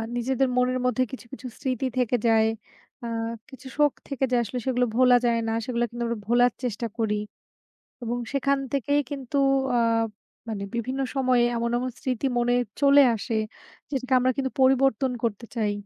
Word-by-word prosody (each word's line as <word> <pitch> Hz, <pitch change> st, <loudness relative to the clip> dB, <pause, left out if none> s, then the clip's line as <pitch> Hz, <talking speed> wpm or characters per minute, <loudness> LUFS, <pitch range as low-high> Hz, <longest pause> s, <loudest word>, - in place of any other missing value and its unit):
নিজেদের 260 Hz, +2 st, +1 dB
মনের 255 Hz, 0 st, +2 dB
মধ্যে 250 Hz, +1 st, +2 dB
কিছু, 260 Hz, -, -8 dB
কিছু 270 Hz, -, -7 dB
স্মৃতি 260 Hz, -2 st, -2 dB
থেকে 250 Hz, -1 st, +2 dB
যায়। 220 Hz, -1 st, +4 dB, 0.6 s
আ -, -, -4 dB, 0.4 s
কিছু 265 Hz, -1 st, -12 dB
শোক 295 Hz, -1 st, +4 dB, 0.2 s
থেকে 275 Hz, -2 st, -3 dB
যায়, 245 Hz, -1 st, +3 dB
আসলে 250 Hz, +4 st, -4 dB
সেগুলো 250 Hz, -1 st, +2 dB
ভোলা 250 Hz, 0 st, +6 dB
যায় 235 Hz, -1 st, +2 dB
না। 225 Hz, -, 0 dB
সেগুলা 240 Hz, -1 st, 0 dB
কিন্তু 240 Hz, 0 st, -5 dB
আমরা 230 Hz, -2 st, -3 dB
ভোলার 245 Hz, +1 st, +4 dB
চেষ্টা 235 Hz, -1 st, -2 dB
করি। 220 Hz, -2 st, 0 dB, 0.9 s
এবং 240 Hz, 0 st, -2 dB, 0.2 s
সেখান 275 Hz, 0 st, +1 dB
থেকেই 285 Hz, +1 st, +1 dB
কিন্তু 275 Hz, -1 st, -5 dB, 0.4 s
আ -, -, +3 dB, 0.7 s
মানে 210 Hz, -3 st, -4 dB
বিভিন্ন 255 Hz, +4 st, -2 dB
সময়ে 255 Hz, -3 st, +3 dB
এমন, 235 Hz, 0 st, -1 dB
এমন 255 Hz, +1 st, -2 dB
স্মৃতি 260 Hz, +1 st, -1 dB
মনে 245 Hz, 0 st, +2 dB, 0.3 s
চলে 285 Hz, 0 st, +7 dB
আসে, 225 Hz, +1 st, -4 dB, 0.6 s
যেটাকে 265 Hz, -2 st, -3 dB
আমরা 255 Hz, +1 st, +2 dB
কিন্তু 265 Hz, -1 st, -1 dB
পরিবর্তন 265 Hz, -1 st, +3 dB
করতে 230 Hz, 0 st, -2 dB
চাই। 215 Hz, -3 st, 0 dB
250 Hz, 165 wpm, -25 LUFS, 235-265 Hz, 0.9 s, চলে